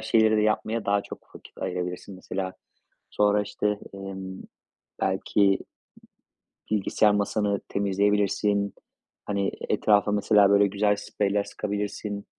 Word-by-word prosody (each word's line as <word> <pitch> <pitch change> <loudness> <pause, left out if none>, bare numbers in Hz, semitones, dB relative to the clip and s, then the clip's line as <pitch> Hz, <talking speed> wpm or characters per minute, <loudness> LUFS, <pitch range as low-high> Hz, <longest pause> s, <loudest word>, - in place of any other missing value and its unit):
şeyleri 110 -1 +3
de - - +3
yapmaya 110 +1 0
daha 100 0 +2
çok - - -12
vakit - - -14
ayırabilirsin. 90 +1 -4
Mesela 95 0 -4 0.6
sonra, 105 0 +2
işte, 105 0 -2
emm, 95 -1 -7 0.6
belki 100 -1 +2 1.1
bilgisayar 105 0 +3
masanı 105 0 0
temizleyebilirsin. 100 0 +1 0.5
Hani, 100 -1 -1 0.2
etrafa, 105 -1 +3
mesela, 105 -1 +4
böyle, 100 0 +5
güzel 105 +1 +1
spreyler 100 0 -1
sıkabilirsin. 105 0 -4
100 Hz, 105 wpm, -26 LUFS, 100-105 Hz, 1.1 s, böyle